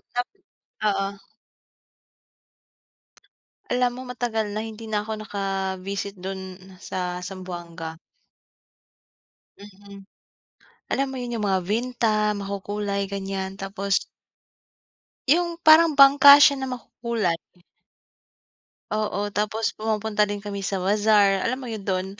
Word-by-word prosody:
nap 245 Hz, 0 st, 0 dB, 0.6 s
oo. 195 Hz, -1 st, +1 dB, 2.6 s
Alam 250 Hz, 0 st, +2 dB
mo 255 Hz, -, -7 dB
matagal 225 Hz, -4 st, -2 dB
na 210 Hz, +1 st, -3 dB
hindi 220 Hz, 0 st, -9 dB
na 210 Hz, 0 st, -1 dB
ako 220 Hz, -, -4 dB
naka-visit 195 Hz, -1 st, -3 dB
dun 190 Hz, 0 st, -6 dB, 0.2 s
sa 180 Hz, -1 st, -4 dB
Zamboanga. 175 Hz, -3 st, -7 dB, 1.7 s
Mm. 200 Hz, 0 st, -13 dB, 0.9 s
Alam 275 Hz, +1 st, +1 dB
mo -, -, -6 dB
yun 240 Hz, -1 st, -4 dB
yung 210 Hz, -2 st, -1 dB
mga 190 Hz, -1 st, +2 dB
vinta, 235 Hz, -1 st, 0 dB, 0.3 s
makukulay, 200 Hz, 0 st, -3 dB
ganyan. 195 Hz, -1 st, -3 dB
Tapos 195 Hz, 0 st, -4 dB, 1.4 s
Yung 340 Hz, +2 st, +3 dB
parang 315 Hz, 0 st, +7 dB
bangka 280 Hz, 0 st, +9 dB
siya 280 Hz, -1 st, +6 dB
na 265 Hz, -, -3 dB
makukulay. 235 Hz, -7 st, -2 dB, 1.5 s
Oo, 205 Hz, -1 st, -1 dB
tapos 215 Hz, +2 st, -1 dB
pumupunta 215 Hz, -1 st, 0 dB
din 205 Hz, 0 st, -5 dB
kami 205 Hz, -1 st, -5 dB
sa 190 Hz, -1 st, -2 dB
bazaar. 205 Hz, -1 st, +3 dB
Alam 255 Hz, +2 st, -1 dB
mo -, -, -6 dB
yun 215 Hz, -3 st, -6 dB
dun, 185 Hz, -1 st, 0 dB
205 Hz, 110 wpm, -24 LUFS, 195-230 Hz, 2.6 s, bangka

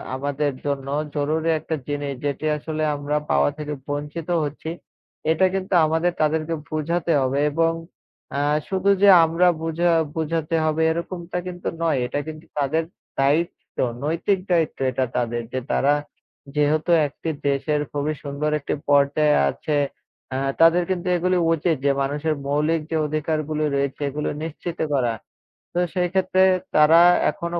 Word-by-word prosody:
আমাদের 145 Hz, +2 st, -1 dB
জন্য 140 Hz, -1 st, -2 dB, 0.3 s
জরুরি 155 Hz, +3 st, 0 dB
একটা 160 Hz, -, -3 dB
জিনিস। 145 Hz, -1 st, -3 dB
যেটি 145 Hz, +2 st, -2 dB
আসলে 155 Hz, +1 st, -4 dB
আমরা 145 Hz, +1 st, -2 dB, 0.2 s
পাওয়া -, -, +3 dB
থেকে 150 Hz, 0 st, -4 dB
বঞ্চিত 150 Hz, +3 st, -4 dB
হচ্ছি। 150 Hz, +2 st, -5 dB, 0.6 s
এটা 185 Hz, +4 st, +3 dB
কিন্তু 190 Hz, 0 st, -2 dB
আমাদের 160 Hz, +3 st, +1 dB
তাদেরকে 155 Hz, +1 st, +1 dB
বুঝাতে 165 Hz, +2 st, -1 dB
হবে 130 Hz, +2 st, 0 dB
এবং 165 Hz, +2 st, +2 dB, 0.7 s
আ -, -, +1 dB, 0.3 s
শুধু 195 Hz, +1 st, +1 dB
যে 205 Hz, -, +7 dB, 0.2 s
আমরা 165 Hz, +3 st, +2 dB
বুঝা 165 Hz, +2 st, +1 dB, 0.2 s
বুঝাতে 160 Hz, 0 st, -1 dB
হবে 155 Hz, +1 st, +1 dB
এরকমটা 170 Hz, +1 st, -4 dB
কিন্তু 175 Hz, -1 st, -6 dB, 0.2 s
নয়। 155 Hz, -6 st, +2 dB
এটা 145 Hz, -, -2 dB
কিন্তু 155 Hz, 0 st, -8 dB
তাদের 155 Hz, +4 st, +1 dB, 0.4 s
দায়িত্ব, 150 Hz, +5 st, 0 dB, 0.3 s
নৈতিক 170 Hz, +6 st, 0 dB
দায়িত্ব 165 Hz, -3 st, +1 dB
এটা 130 Hz, +1 st, 0 dB
তাদের। 120 Hz, 0 st, -1 dB
যে 130 Hz, -, 0 dB
তারা 145 Hz, +2 st, +3 dB, 0.6 s
যেহেতু 150 Hz, +3 st, +2 dB, 0.2 s
একটি 155 Hz, +3 st, -6 dB, 0.2 s
দেশের 145 Hz, +2 st, 0 dB
খুবই 145 Hz, +1 st, -1 dB
সুন্দর 145 Hz, +2 st, -2 dB
একটি 140 Hz, -, -3 dB
পর্যায়ে 145 Hz, +1 st, +4 dB
আছে। 150 Hz, -, -2 dB, 0.6 s
আ -, -, 0 dB, 0.2 s
তাদের 170 Hz, +2 st, +6 dB
কিন্তু 185 Hz, -1 st, -2 dB
এগুলো 180 Hz, +1 st, +1 dB, 0.2 s
উচিত 165 Hz, +1 st, +1 dB
যে 140 Hz, -, +5 dB
মানুষের 150 Hz, +3 st, -1 dB
মৌলিক 150 Hz, +3 st, +1 dB
যে 160 Hz, -, 0 dB
অধিকারগুলো 155 Hz, 0 st, -1 dB
রয়েছে 140 Hz, 0 st, -1 dB
এগুলো 150 Hz, +2 st, -3 dB
নিশ্চিত 165 Hz, +2 st, -6 dB, 0.2 s
করা। 120 Hz, -3 st, +1 dB, 0.6 s
তো 175 Hz, -, 0 dB
সেই 180 Hz, -2 st, 0 dB
ক্ষেত্রে 190 Hz, 0 st, +3 dB, 0.3 s
তারা 155 Hz, +2 st, +7 dB, 0.3 s
এখনো 170 Hz, 0 st, -4 dB
155 Hz, 145 wpm, -23 LUFS, 145-165 Hz, 0.7 s, যে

